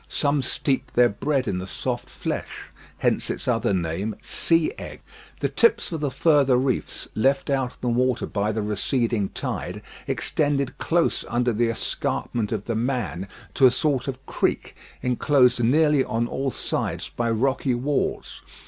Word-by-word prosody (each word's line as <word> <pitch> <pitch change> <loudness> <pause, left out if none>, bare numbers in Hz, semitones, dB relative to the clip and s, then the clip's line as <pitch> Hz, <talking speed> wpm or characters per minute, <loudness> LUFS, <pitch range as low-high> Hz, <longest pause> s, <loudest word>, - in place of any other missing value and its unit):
Some 145 -1 +1
steep 135 +2 -1
their 120 0 +5
bread 135 +5 -1
in 90 - -1
the 95 - -6
soft - - -3
flesh. - - -4 0.3
Hence - - 0
its - - -4
other - - +1
name, 95 +4 -1
"Sea 165 +3 +1
egg." - - -8 0.4
The - - +2
tips 465 - +2
of 165 - -3
the 145 -1 0
further 140 -2 +4
reefs, 130 -1 -1
left 135 +5 +1
out 130 -2 0
of - - -26
the 125 - -2
water 125 0 +1
by 105 +2 -1
the 110 0 -2
receding 105 0 0
tide, - - -4 0.2
extended 145 -3 0
close 170 0 +1
under 120 0 +1
the 115 +2 +1
escarpment 115 -1 -2
of 105 -3 -2
"The 115 - -1
Man" 115 -6 -2 0.3
to 135 - +6
a - - +4
sort 135 +1 0
of 135 0 -5
creek, - - -1 0.3
enclosed 125 -1 +3
nearly 150 +3 +4
on 115 0 -1
all 135 +3 -2
sides - - -2
by 120 -1 -2
rocky 130 +2 +1
walls. 140 +4 -2
125 Hz, 160 wpm, -24 LUFS, 115-140 Hz, 0.4 s, to